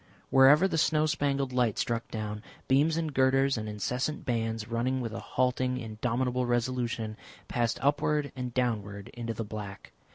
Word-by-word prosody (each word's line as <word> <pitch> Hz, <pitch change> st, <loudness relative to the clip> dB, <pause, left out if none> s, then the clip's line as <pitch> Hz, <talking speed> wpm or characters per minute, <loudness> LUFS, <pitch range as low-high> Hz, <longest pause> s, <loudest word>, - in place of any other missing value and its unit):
Wherever 145 Hz, +7 st, +7 dB
the 165 Hz, -, 0 dB
snow 155 Hz, 0 st, +3 dB
spangled 140 Hz, -3 st, 0 dB
light 120 Hz, -4 st, +1 dB
struck 115 Hz, -1 st, -1 dB
down, 105 Hz, -1 st, -4 dB, 0.3 s
beams 150 Hz, +5 st, +3 dB
and 160 Hz, -3 st, -2 dB
girders, 135 Hz, +1 st, +3 dB
and 110 Hz, -2 st, -4 dB
incessant 125 Hz, -, -2 dB
bands 115 Hz, -3 st, -1 dB
running 120 Hz, +3 st, 0 dB
with 115 Hz, -3 st, -4 dB
a -, -, -4 dB
halting, 125 Hz, 0 st, 0 dB
indomitable 125 Hz, +2 st, -1 dB
resolution, 120 Hz, -2 st, -1 dB, 0.3 s
passed 120 Hz, -1 st, 0 dB
upward 145 Hz, 0 st, +1 dB
and 125 Hz, -1 st, -4 dB
downward 105 Hz, -5 st, -2 dB
into 115 Hz, -1 st, -5 dB
the 115 Hz, -, -3 dB
black. 105 Hz, -2 st, -8 dB
125 Hz, 155 wpm, -29 LUFS, 115-135 Hz, 0.3 s, Wherever